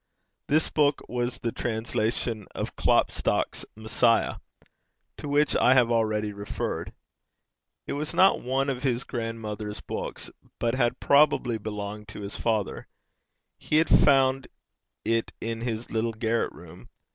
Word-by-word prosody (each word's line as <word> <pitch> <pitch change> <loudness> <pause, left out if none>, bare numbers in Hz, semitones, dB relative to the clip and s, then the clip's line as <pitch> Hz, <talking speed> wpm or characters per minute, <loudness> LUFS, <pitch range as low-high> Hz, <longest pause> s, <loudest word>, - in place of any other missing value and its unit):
This 155 +2 +3
book 145 -1 +2
was 120 0 -2
the 115 - -3
translation 110 -1 -2
of - - -4
Klopstock's - - +1
Messiah, 110 +1 +2 0.8
to - - -7
which 145 +1 +2
I 130 - +5
have 120 -2 +4
already 110 -2 +1
referred. 100 0 -4 0.9
It - - -4
was 150 +2 -3
not 185 +3 +4
one 135 +2 0
of 130 -2 -2
his 125 -2 0
grandmother's 110 -3 -5
books, - - -6 0.3
but 115 -1 0
had 125 -1 +1
probably 140 -5 +3
belonged 105 0 -6
to 105 - -8
his 100 0 -6
father: 110 -4 -1 0.7
he - - -2
had 160 +1 +3
found 135 -2 +4 0.6
it 115 0 0
in 115 0 -4
his 115 -1 -4
little 115 +1 0
garret 115 +1 0
room. 85 +1 -14
115 Hz, 135 wpm, -27 LUFS, 110-130 Hz, 0.9 s, I